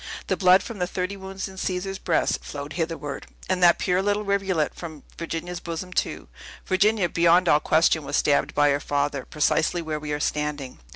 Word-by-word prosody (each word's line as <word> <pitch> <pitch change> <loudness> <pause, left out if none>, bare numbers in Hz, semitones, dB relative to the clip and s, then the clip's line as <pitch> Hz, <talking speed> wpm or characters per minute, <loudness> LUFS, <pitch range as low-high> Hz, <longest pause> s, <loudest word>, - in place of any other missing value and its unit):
The - - 0
blood 185 0 +5
from 225 -4 -8
the 180 - 0
thirty 185 +2 -3
wounds 190 0 -6
in 190 0 -12
Caesar's 190 +1 -3
breast 170 - 0
flowed 145 +1 -7
hitherward, 165 -4 -4 0.2
and 185 -1 0
that 175 -1 +6
pure 180 0 +1
little 205 +1 0
rivulet 195 -6 0
from 160 -4 -9
Virginia's 170 +1 -5
bosom, 175 +2 -6
too! - - -2 0.4
Virginia, 200 0 +2
beyond 170 +2 +4
all 150 - +5
question, 160 0 +3
was 140 - -1
stabbed 145 -1 +2
by 145 0 +4
her 140 - +1
father, 145 -1 -1
precisely 155 +3 +1
where 155 -2 -3
we 150 0 -6
are 145 - -1
standing." 150 -3 -3
170 Hz, 185 wpm, -24 LUFS, 150-185 Hz, 0.4 s, that